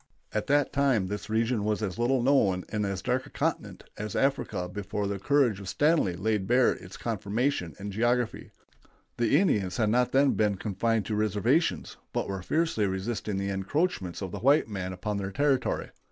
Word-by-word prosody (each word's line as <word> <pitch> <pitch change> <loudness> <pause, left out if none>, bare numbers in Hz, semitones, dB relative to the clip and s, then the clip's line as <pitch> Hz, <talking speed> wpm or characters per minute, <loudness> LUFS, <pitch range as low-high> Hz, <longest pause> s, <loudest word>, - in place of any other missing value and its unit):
At 110 - -1
that 145 0 +2
time 135 -8 +2
this 105 +1 -5
region 115 0 +1
was 105 +1 -1
as 100 +1 -3
little 120 +1 +2
known 100 -9 +3
and 105 -1 -1
as 95 -1 -4
dark 125 +1 -1
a - - -13
continent - - -3 0.2
as 105 -1 -4
Africa 120 -9 0
before 100 +2 -4
the 100 0 -2
courage 130 -4 +2
of 100 -2 -7
Stanley 150 - +2
laid 100 +1 -1
bare 125 +1 +4
its - - -8
conformation 110 - -1
and 100 +1 -6
geography. 120 +3 0 0.7
The 120 +3 +3
Indians 100 - +1
had 110 -3 +2
not 125 +1 +2
then 140 +1 +4
been 105 -2 +1
confined 110 +2 0
to 110 - -3
reservations, 110 - +1 0.2
but - - -1
were 95 -1 -4
fiercely 155 - 0
resisting 100 +2 -3
the 100 0 -2
encroachments 100 - -1
of 95 - -5
the - - -5
white 140 +2 +4
men 95 -4 -4
upon 100 +3 -3
their 100 -1 -3
territory. 135 0 0
110 Hz, 180 wpm, -28 LUFS, 100-130 Hz, 0.7 s, bare